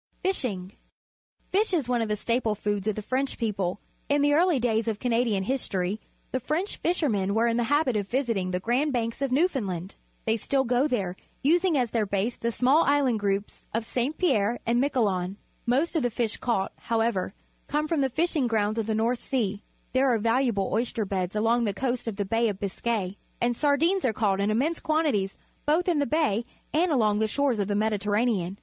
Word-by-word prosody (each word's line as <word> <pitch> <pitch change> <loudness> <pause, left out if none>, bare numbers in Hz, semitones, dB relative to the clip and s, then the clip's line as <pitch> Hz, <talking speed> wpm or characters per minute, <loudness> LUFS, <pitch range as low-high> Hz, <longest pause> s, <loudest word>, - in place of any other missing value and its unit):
Fishing. 225 - -1 0.4
— - - -45
Fish 395 0 +2
is 295 -8 0
one 245 -1 +1
of 225 - 0
the 210 - +1
staple 230 0 0
foods 205 -1 -2
of 215 - +1
the 215 - -5
French 265 +4 -1
people. 200 -5 -1 0.3
Tn 285 0 +3
the 290 0 +4
early 335 -1 +4
daj^s 230 -1 +1
of 220 -2 0
Canadian 230 -4 +1
history, 200 -4 -1 0.3
the 260 - 0
French 315 - -2
fishermen 220 - 0
were 225 +1 +3
in 230 -1 +2
the 240 - +1
habit 290 -2 +2
of 205 -2 -1
visiting 230 -7 0
the 180 0 -1
Grand 250 +9 +1
Banks 230 +1 -2
of 275 -2 0
Newfoundland. 215 - 0 0.3
They 225 0 +2
still 265 +5 +1
gotherer 245 -7 0 0.3
using 340 +2 +3
as 245 -3 0
their 220 -3 0
base 200 +5 -1
the 235 - -2
small 260 +7 +3
island 275 -5 +2
groups 200 0 -2
of 230 0 -1
St 255 +6 -1
Pierre 240 - +2
and 240 +2 +2
Miquelon. 200 -9 0 0.3
Most 275 +9 +1
of 320 - +2
the 245 - +1
fish 230 -2 -2
caught, 195 -6 -1
however, 225 -5 -1 0.3
come 300 +2 0
from 315 -2 +1
the 270 - +2
fishing 310 0 +1
grounds 215 -1 0
of 220 - -2
the 220 - 0
North 230 +2 +1
Sea. 210 -7 -2 0.3
There 260 0 +3
are 235 - +3
valu 230 +5 +2
able 200 -5 0
oyster 225 -1 0
beds 190 0 -2
alongTHe 225 -1 +2
coast 245 -1 -2
of 225 - -2
the 200 0 -2
Bay 225 +3 +1
of 200 -2 -5
Biscay, 200 -1 -2 0.2
and 240 0 +1
sardings 310 +8 +2
are 245 - +2
caught 205 -3 +1
in 200 +1 +1
immense 280 +10 +1
quantities 295 -12 0 0.3
both 325 +5 +2
in 340 -4 +2
the 285 - +1
Bay 240 -6 +1 0.3
and 335 +3 +2
along 215 -6 +2
the 220 - +2
shores 265 -1 +1
of 200 - 0
the 205 - 0
Mediterranean. 210 -2 0
235 Hz, 200 wpm, -27 LUFS, 205-275 Hz, 0.4 s, the